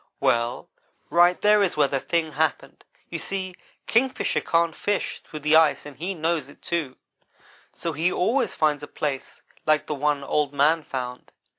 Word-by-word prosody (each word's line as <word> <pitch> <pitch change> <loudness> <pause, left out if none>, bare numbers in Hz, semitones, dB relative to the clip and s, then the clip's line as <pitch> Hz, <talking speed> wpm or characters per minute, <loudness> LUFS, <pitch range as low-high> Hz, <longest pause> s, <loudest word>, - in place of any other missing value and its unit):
"Well 120 +1 +1 0.4
right 175 +1 +5
there 210 0 +5
is 185 -5 +1
where 145 -2 +4
the 135 0 -1
thing 160 +2 -1
happened. 150 0 -2 0.3
You - - -3
see, 190 -1 -4 0.3
Kingfisher 255 +3 +1
can't 165 -1 +1
fish 205 -1 -2
through 155 - -10
the 150 +1 +3
ice 160 -3 +4
and 145 -2 -9
he 180 +8 -4
knows 160 -3 -1
it, - - -18
too; 160 -7 -2 0.8
so 165 - -4
he 165 +5 +1
always 225 +1 +1
finds 150 -2 +1
places 145 -2 -4 0.2
like 155 -1 +3
the - - -3
one 145 0 0
Old 145 0 0
man 150 +4 +3
found. 125 -4 -6
155 Hz, 165 wpm, -25 LUFS, 145-175 Hz, 0.8 s, right